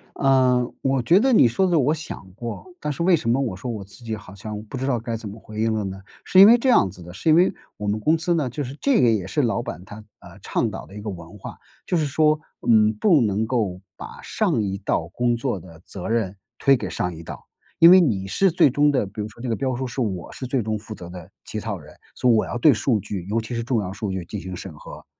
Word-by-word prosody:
嗯， 130 -2 +2
我 135 -1 +1
觉 170 +11 +4
得 260 +4 +3
你 130 - +6
说 190 +12 +1
的 175 - +2
我 145 +4 +2
想 155 -10 -7
过， 115 - -6
但 150 -1 -3
是 170 +4 -3
为 180 0 +5
什 115 -7 -2
么 125 - +2
我 115 -9 -2
说 100 +7 -6
我 110 -4 -4
自 100 +5 -14
己 110 -1 -3
好 105 -2 -12
像 105 +1 -7
不 110 - -9
知 135 +2 -2
道 125 -4 +1
该 115 0 -4
怎 110 -2 -7
么 105 - -10
回 110 0 -9
应 110 0 +1
了 110 - -1
呢？ 95 0 -6 0.2
是 185 - +4
因 195 - +11
为 235 - +8
这 260 +2 0
样 100 - +5
子 90 -1 -12
的， 90 - -11
是 130 - -1
因 155 - +6
为 180 +2 +4 0.2
我 105 - -5
们 105 +1 0
公 155 +9 +2
司 170 +2 0
呢 150 -7 0
就 145 +5 -4
是 130 +1 -7
这 275 -4 +3
个 120 - +5
也 100 -5 -1
是 145 +8 0
老 120 0 0
板 90 - -7
他， 105 - -10 0.2
啊， - - -14
倡 - - -1
导 - - -7
的 100 - -14
一 105 - -7
个 105 - -5
文 85 +1 -9
化。 - - -9 0.3
就 - - -1
是 155 - +1
说， 155 +2 +2 0.3
嗯， 110 -1 +5
不 155 - +3
能 105 -1 +1
够 110 -7 -1 0.2
把 - - -10
上 110 - 0
一 100 -1 -2
道 85 -4 -1
工 120 +5 0
作 115 -4 -2
的 85 -1 -14
责 90 - -7
任， 110 -4 0 0.2
推 140 -1 +4
给 120 - -4
上 90 -3 -2
一 80 - -9
道， 80 - -10 0.3
因 170 +2 +8
为 185 - +8
你 100 - 0
是 190 - +2
最 160 - +5
终 145 +3 +3
的 130 -7 +1
比 100 +2 -7
如 105 - -3
说 100 - -18
这 130 - -4
个 115 - 0
标 130 -2 -2
书， 130 +2 -3
是 130 +1 -4
我 95 -7 -3
是 130 - -6
最 125 -2 0
终 110 0 -2
负 110 +1 -9
责 85 -3 -10
的 90 -1 -10 0.2
起 - - -5
草 - - -4
人， - - -14 0.2
所 125 - +1
以 - - +5
我 110 - +3
要 - - -4
对 140 +3 +5
数 110 0 +1
据 95 -1 -5
尤 110 +3 0
其 115 +2 -6
是 115 - -2
重 115 -2 0
要 95 0 -5
数 100 -1 -4
据 95 -2 -4
进 105 +4 -6
行 95 -1 -7
审 90 -2 -8
核。 75 - -12
115 Hz, 305 characters per minute, -23 LUFS, 100-135 Hz, 0.3 s, 因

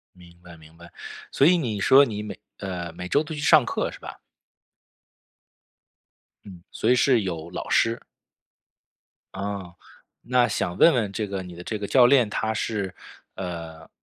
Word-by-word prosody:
明 85 -1 -17
白 85 -1 -13
明 80 0 -18
白。 85 0 -14 0.4
所 140 - +3
以 180 +1 +5
你 110 -9 -3
说 135 +7 +6
你 105 -4 -5
每 105 - -8 0.2
呃， 90 -4 -5
每 90 +2 -7
周 145 - +2
都 155 0 -7
去 145 - -6
上 150 -2 +5
课 - - -2
是 - - -11
吧？ - - -10 2.3
嗯， 90 -4 -12
所 115 - -1
以 - - +6
是 125 -2 +3
有 85 -3 -5
老 - - -6
师。 115 0 +2 1.4
啊， 95 -2 -5 0.5
那 125 -1 +2
想 90 -4 -3
问 170 - +6
问 105 -5 -1
这 105 +1 -3
个 95 -1 -5
你 90 -2 -11
的 90 - -10
这 110 - -3
个 100 -1 -5
教 125 -2 +6
练， 125 -5 +4
他 110 +1 -2
是， 105 -4 -3 0.4
呃， 85 -3 -7
100 Hz, 180 characters per minute, -24 LUFS, 90-120 Hz, 2.3 s, 说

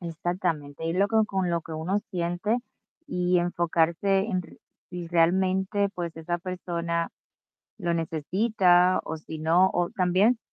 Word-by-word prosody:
Exactamente, 165 -3 -3
y 165 - 0
luego, 205 +4 +3
con 190 -3 -1
lo 170 - 0
que 160 - -10
uno 180 +6 -1
siente 175 +6 -1 0.5
y 180 -7 +1
enfocarse 175 +2 +1
en 185 -4 0
r - - -16 0.3
y 175 -1 -5
realmente, 190 +4 +2
pues, 170 -2 -5
esa 175 +2 -3
persona 170 -2 -3 0.7
lo 170 - -1
necesita, 180 +3 +2
o 160 - -4
si 160 0 -8
no, 170 +4 +4
o 175 -1 0
también 200 +3 +3
175 Hz, 135 wpm, -26 LUFS, 165-190 Hz, 0.7 s, no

